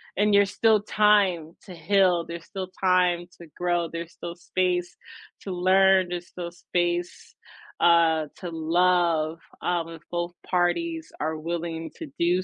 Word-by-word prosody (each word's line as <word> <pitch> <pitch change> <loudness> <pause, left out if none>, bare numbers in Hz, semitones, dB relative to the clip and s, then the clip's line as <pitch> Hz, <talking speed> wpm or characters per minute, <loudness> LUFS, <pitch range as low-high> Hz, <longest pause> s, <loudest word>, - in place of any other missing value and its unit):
and 210 +2 +2
you're 200 0 +6
still 215 +2 +3
time 200 -6 +2
to 190 - -10
heal. 180 0 +2
There's 170 0 -7
still 190 -1 -6
time 180 -2 +3 0.2
to 170 - -11
grow. 175 -2 0
There's 170 0 -6
still 170 0 -7
space 180 0 -1 0.5
to - - -8
learn. 185 +1 +4
There's 175 0 -5
still 175 -1 -7
space, 175 0 -3 0.5
uh, 165 -2 +4
to 180 - -5
love, 165 -1 +1 0.2
um, 170 -2 -1
if 165 -1 -11
both 175 0 -2
parties 320 - 0
are 160 +1 -1
willing 165 0 -4
to 325 - -7
do 175 +2 +2
175 Hz, 145 wpm, -25 LUFS, 170-185 Hz, 0.5 s, you're